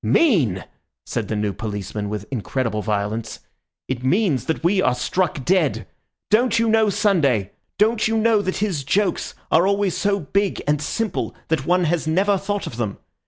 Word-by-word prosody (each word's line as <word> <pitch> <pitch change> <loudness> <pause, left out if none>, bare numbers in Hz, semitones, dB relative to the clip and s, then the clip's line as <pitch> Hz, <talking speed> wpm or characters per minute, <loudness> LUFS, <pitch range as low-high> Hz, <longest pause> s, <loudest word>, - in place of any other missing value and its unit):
"Mean!" 150 - +2 0.4
said - - -3
the 110 - -2
new 105 -1 -1
policeman 105 -1 -4
with 105 -1 -4
incredible 115 -2 -2
violence. 105 +1 -2 0.5
"It 130 -1 -3
means 155 - +1
that 160 - -2
we 190 +3 +3
are 130 -6 +2
struck 165 +2 -1
dead! 150 - +1 0.5
Don't 235 +2 +3
you 230 0 +2
know 220 -1 +4
Sunday? 140 - +2 0.3
Don't 220 +2 +3
you 225 0 0
know 220 -1 +3
that 185 -2 -2
his 190 -9 -1
jokes 190 +6 0 0.2
are 170 +4 +4
always 200 -2 +1
so 200 0 +1
big 195 +5 -1
and 150 0 +1
simple 225 +8 -2
that 155 -4 0
one 180 +1 +3
has 165 -1 0
never 195 +5 +2
thought 205 +1 -3
of 115 - -7
them? 110 -4 -3
165 Hz, 170 wpm, -22 LUFS, -, 0.5 s, know